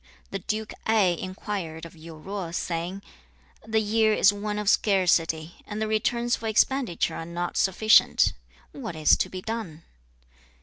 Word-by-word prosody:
The 195 - -3
Duke 215 +3 -4
Ai 205 -5 +3
inquired 185 -4 -5
of 165 - -12
Yu 160 -1 -12
Zo, 195 -3 -4
saying, 175 +3 -3 0.6
'The 220 0 +2
year 220 0 +2
is 205 - +5
one 210 +1 -4
of 210 -1 -3
scarcity, 175 -6 +2
and 210 0 -5
the 220 - -1
returns 235 +2 0
for 225 - -5
expenditure 225 -3 +1
are - - -5
not 170 +1 -4
sufficient; 215 +3 +4 0.4
what 225 - -7
is 155 -1 +5
to - - -1
be 185 0 -7
done?' 215 -9 -5
195 Hz, 150 wpm, -26 LUFS, 170-220 Hz, 0.6 s, is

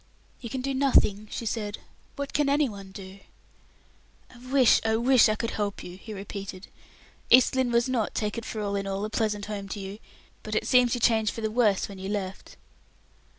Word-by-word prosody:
"You 235 - -7
can 260 +3 -3
do 275 +1 -2
nothing," 230 -6 +3
she 230 - -5
said. 215 -1 -3 0.4
"What 280 0 -5
can 295 -1 +2
any 285 0 +3
one 195 -4 -9
do?" 190 0 -10 1.1
"I - - -15
wish, 265 -4 +5
I 220 0 +1
wish 245 0 +5
I 215 - +1
could 230 +1 -3
help 205 -1 -3
you!" 180 - -9
he 205 +4 -11
repeated. 195 -1 -7 0.6
"East 255 +1 +6
Lynne 260 -2 +1
was 235 +1 +2
not, 245 -5 -1
take 210 -1 -1
it 230 - -4
for 215 - -4
all 200 -1 -2
in 195 0 -2
all, 195 +1 -2
a 215 - -6
pleasant 210 -2 -1
home 205 -2 -5
to 205 - -5
you, 195 +2 -7 0.4
but 215 0 -5
it - - 0
seems 250 -1 +4
you - - -3
changed 220 -2 +3
for 225 - -7
the 220 -1 -1
worse 215 -4 +2
when 195 -2 -10
you 190 +1 -5
left." 195 -2 -5
215 Hz, 210 wpm, -27 LUFS, 200-245 Hz, 1.1 s, East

